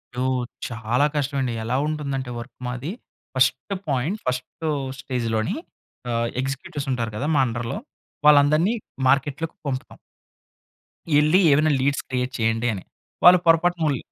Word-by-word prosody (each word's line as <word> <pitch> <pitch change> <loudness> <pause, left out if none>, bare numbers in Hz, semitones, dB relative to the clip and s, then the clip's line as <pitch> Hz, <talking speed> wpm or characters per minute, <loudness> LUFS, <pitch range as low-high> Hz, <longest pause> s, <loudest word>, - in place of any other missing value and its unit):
యో, 125 - -1 0.4
చాలా 115 +3 0
కష్టవండి. 135 -4 0
ఎలా 115 +3 -1
ఉంటుందంటే 140 -4 -3
వర్క్ 120 +1 -10
మాది, 130 +7 -4 0.4
ఫస్టు 130 +7 +2
పోయింట్ 145 - 0
ఫస్టు 130 +6 -3 0.3
స్టేజులోని 115 -4 -1 0.6
ఆహ్, 115 0 0
ఎగ్జిక్యూటివ్సుంటారు 135 -3 -3
కదా 140 +8 -2
మా - - +4
అండర్‌లో, 115 - -3 0.5
వాళ్ళందరినీ 150 +7 +5 0.3
మార్కెట్‌ 135 +1 +2
లోకి 165 - -4
పంపుతాం. 130 -1 -4 1.2
ఎళ్లి 155 +5 +4
ఏమైనా 155 +2 +3
లీడ్స్ 140 +1 +1
క్రియేట్ 125 -1 -1
చేయండి 115 +1 +1
అని. 95 - -6 0.4
వాళ్ళు 180 0 +9
పొరపాటుముల్ 165 -3 +3
135 Hz, 120 wpm, -23 LUFS, 125-150 Hz, 1.2 s, వాళ్ళు